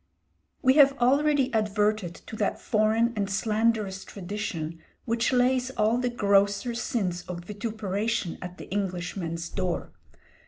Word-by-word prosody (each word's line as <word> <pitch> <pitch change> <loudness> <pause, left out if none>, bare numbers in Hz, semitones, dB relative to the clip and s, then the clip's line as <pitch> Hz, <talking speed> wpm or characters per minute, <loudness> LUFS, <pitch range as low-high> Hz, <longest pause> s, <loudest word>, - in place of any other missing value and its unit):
We 260 -1 +6
have 280 -1 +7
already 275 +1 +3
adverted 210 -4 +1
to - - -8
that - - 0
foreign 220 +2 +2
and 200 -2 -1
slanderous 210 -1 0
tradition 175 -5 -5 0.3
which 230 +1 +1
lays 255 0 +2
all 230 -1 +1
the 250 0 0
grosser 200 0 +2
sins 195 -7 -2
of 175 -1 -6
vituperation 210 -2 -2
at 180 0 -7
the - - -9
Englishman's 175 -3 -3
door. 180 -2 -3
210 Hz, 125 wpm, -27 LUFS, 190-235 Hz, 0.3 s, have